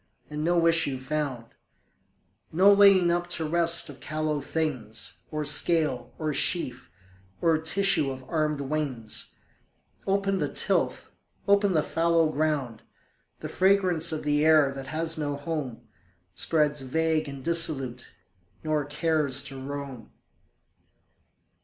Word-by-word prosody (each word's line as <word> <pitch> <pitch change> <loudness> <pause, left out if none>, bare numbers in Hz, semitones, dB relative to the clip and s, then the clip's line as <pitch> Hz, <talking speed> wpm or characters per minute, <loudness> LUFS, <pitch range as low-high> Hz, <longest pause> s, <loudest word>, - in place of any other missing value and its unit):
and 150 0 -4
no 170 0 +2
issue 165 -5 +2
found; 130 -4 -4 1.0
No 190 +5 +6
laying 195 -3 +6
up 175 0 -1
to 170 -3 -1
rest 170 +1 +2
of 145 -3 -10
callow 155 -1 -2
things, 135 -8 -3
Or 150 -1 -3
scale, 150 -5 +1
or 155 -1 -2
sheaf, 135 - -1 0.5
or 165 -1 +3
tissue 165 -2 +2
of 130 -1 -8
armed 155 -3 -1
wings: 135 -6 -3 0.7
Open 195 0 0
the - - -1
tilth, - - -1 0.4
open 200 -1 +3
the 155 -2 +2
fallow 165 -1 +1
ground! 145 -7 -2 0.6
The - - -5
fragrance 185 -4 +2
of 155 - -4
the 145 0 +1
air 155 -3 +5
that 135 -1 -8
has 160 +2 -2
no 145 -1 -2
home 145 -5 -5 0.5
Spreads 150 - +1
vague 155 +3 0
and 140 -1 -8
dissolute, 135 -7 +1 0.6
nor 155 -2 -1
cares 150 -2 0
to 135 -2 -8
roam. 140 -4 -7
155 Hz, 125 wpm, -26 LUFS, 140-165 Hz, 1.0 s, No